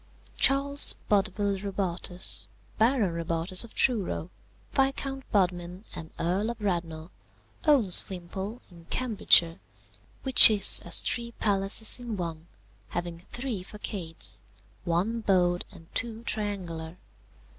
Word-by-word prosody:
"Charles 280 Hz, +1 st, +4 dB
Bodville 200 Hz, -1 st, 0 dB
Robartes, 185 Hz, -2 st, -1 dB, 0.3 s
Baron 225 Hz, -5 st, +2 dB
Robartes 170 Hz, +3 st, +1 dB
of 235 Hz, -, -14 dB
Truro, 200 Hz, -7 st, -1 dB, 0.4 s
Viscount 270 Hz, 0 st, -2 dB
Bodmin 180 Hz, 0 st, -1 dB
and 160 Hz, -2 st, -8 dB
Earl 190 Hz, +6 st, -1 dB
of 235 Hz, -, -6 dB
Radnor, 170 Hz, -5 st, -4 dB, 0.6 s
owns 255 Hz, -, +5 dB
Wimpole 190 Hz, +5 st, -7 dB
in 170 Hz, -1 st, -16 dB
Cambridgeshire, 200 Hz, -8 st, +3 dB, 0.6 s
which 265 Hz, -3 st, +9 dB
is 205 Hz, -3 st, +4 dB
as -, -, +4 dB
three 235 Hz, -1 st, -3 dB
palaces 205 Hz, +3 st, +1 dB
in 235 Hz, -4 st, -6 dB
one, 165 Hz, -2 st, -6 dB, 0.4 s
having 175 Hz, -1 st, -5 dB
three 225 Hz, +1 st, -6 dB
façades, 190 Hz, -5 st, -3 dB, 0.4 s
one 185 Hz, +7 st, -1 dB
bowed 180 Hz, -4 st, +1 dB
and 175 Hz, -4 st, -14 dB
two 225 Hz, 0 st, -3 dB
triangular. 180 Hz, -7 st, -5 dB
195 Hz, 110 wpm, -27 LUFS, 175-225 Hz, 0.6 s, which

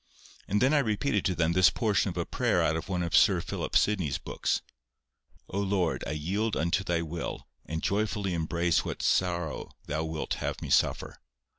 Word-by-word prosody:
And 105 Hz, +4 st, +1 dB
then 135 Hz, +4 st, +4 dB
I 150 Hz, -, +5 dB
repeated 135 Hz, +2 st, 0 dB
to 90 Hz, -, +1 dB
them 85 Hz, 0 st, +2 dB
this 90 Hz, -2 st, +6 dB
portion 105 Hz, +2 st, +1 dB
of 90 Hz, -, -6 dB
a 85 Hz, -, -1 dB
prayer -, -, +1 dB
out 80 Hz, -, +2 dB
of 80 Hz, -, -5 dB
one 90 Hz, -2 st, -1 dB
of 85 Hz, -, -1 dB
Sir -, -, +5 dB
Philip -, -, -1 dB
Sidney's 90 Hz, -10 st, +1 dB
books:— -, -, -2 dB, 0.8 s
"O 100 Hz, -, -3 dB
Lord, 95 Hz, -4 st, 0 dB
I 70 Hz, -, -2 dB
yield 100 Hz, +9 st, -1 dB
unto 85 Hz, +4 st, +1 dB
Thy 85 Hz, -2 st, 0 dB
will, 85 Hz, +1 st, -5 dB, 0.2 s
and 80 Hz, 0 st, -4 dB
joyfully 100 Hz, -2 st, 0 dB
embrace 85 Hz, 0 st, +1 dB
what -, -, -5 dB
sorrow 85 Hz, -4 st, 0 dB, 0.2 s
Thou 75 Hz, +2 st, -2 dB
wilt 80 Hz, -1 st, -3 dB
have -, -, -2 dB
me -, -, -6 dB
suffer. -, -, +1 dB
90 Hz, 185 wpm, -29 LUFS, 80-100 Hz, 0.8 s, this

